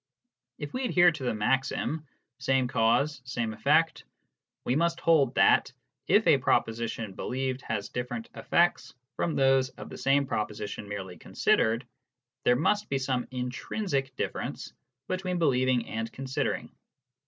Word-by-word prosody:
If 145 -1 -7
we 255 - -2
adhere 175 -6 +5
to 165 - -8
the 125 - 0
maxim 135 +7 -1
" - - -54
same 130 -1 +2
cause, 130 +4 +1
same 120 -3 -3
effect," 155 +8 +2 0.6
we 125 - +1
must 170 +2 +1
hold 150 -7 +3
that, - - +4 0.4
if - - +4
a - - +5
proposition 115 -2 0
believed 130 +4 -3
has 105 -4 -3
different 120 -2 -4
effects 170 +10 +1 0.2
from 165 - -1
those 135 -1 +3
of - - -11
the - - -8
same 140 +1 +3
proposition 105 -3 -4
merely 95 -3 -6
considered, 115 +3 +1 0.6
there 125 - +5
must 205 +10 +1
be 140 - +1
some 130 -2 -1
intrinsic 135 - -3
difference - - -4 0.3
between 185 -1 -2
believing 130 -6 +2
and 115 +1 -4
considering. 135 0 -3
130 Hz, 140 wpm, -28 LUFS, 115-150 Hz, 0.6 s, adhere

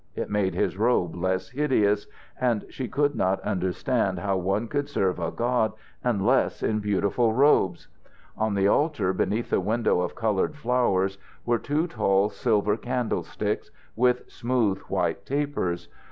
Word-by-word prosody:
It - - -4
made 100 -2 +1
his - - 0
robe 110 -7 +2
less 95 +1 -1
hideous, 125 -7 +1 0.3
and 120 -5 +1
she 130 - -4
could 145 +2 +1
not 95 +1 +1
understand 95 +3 -1
how 100 -1 -1
one 95 +5 0
could 145 +3 -2
serve 95 -10 0
a 85 - -1
god 120 -2 0 0.3
unless 120 +2 +1
in 110 -1 +1
beautiful 105 +3 +1
robes. 115 - +3 0.5
On 110 -2 0
the 100 0 +3
altar 110 - +2
beneath 110 +5 -1
the - - +3
window 105 -1 +1
of 90 - -3
coloured 110 +3 0
flowers 115 -8 +1 0.3
were 120 -1 +2
two 150 +6 0
tall 100 - +2
silver 105 -4 +1
candlesticks, 125 -2 -2 0.3
with 125 +1 +2
smooth 115 -5 0
white - - -1
tapers. 130 -12 -2
110 Hz, 145 wpm, -26 LUFS, 95-125 Hz, 0.5 s, robes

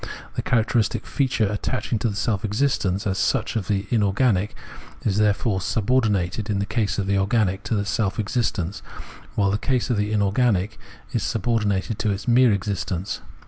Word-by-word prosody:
The - - -1
characteristic 115 -1 +1
feature 130 -5 +1
attaching 105 +2 -2
to 115 - 0
the 100 - -4
self 100 -2 -1
existence 105 -4 0
as 95 -1 0
such - - 0
of 105 -5 -2
the 100 -1 0
inorganic 105 -2 +2 0.5
is 105 -1 +1
therefore 105 -1 +2
subordinated 105 -2 0
in 105 - +1
the 100 - 0
case 105 -1 -1
of 100 - 0
the 100 0 +1
organic 100 -2 +1
to 110 +1 0
its 100 -1 -1
self 105 -1 0
existence, 105 -4 -1 0.5
while 100 -2 +2
in - - +1
the 105 - +1
case 125 -1 0
of 120 - +1
the 105 +1 0
inorganic 105 0 +1 0.3
it - - 0
is - - -1
subordinated 105 -2 0
to 110 - +1
its 100 +4 -3
mere 120 0 +5
existence. 100 -1 -2
105 Hz, 180 wpm, -23 LUFS, 100-115 Hz, 0.5 s, mere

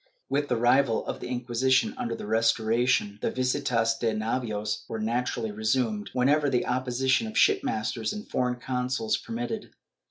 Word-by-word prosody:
^ - - -40 0.3
With 145 +1 0
the 125 - +1
revival 120 +1 +3
of - - -4
the - - -6
Inquisition 130 - +1
under 250 -2 -3
the - - -7
Restoration, 115 0 +1
the - - +1
visitas 125 -3 +1
de 115 -2 0
navios 110 -1 -2
were 115 - -3
naturally 115 0 -1
resumed, 110 0 0
whenever 145 +3 +3
the 125 -2 +1
oppo 130 +1 -1 0.2
sition 135 +12 +3
of 220 0 -5
shipmasters 405 - +1
and 210 0 -7
foreign 125 -1 0
consuls 130 - -1
permitted. 230 -2 -5
125 Hz, 160 wpm, -27 LUFS, 115-140 Hz, 0.3 s, revival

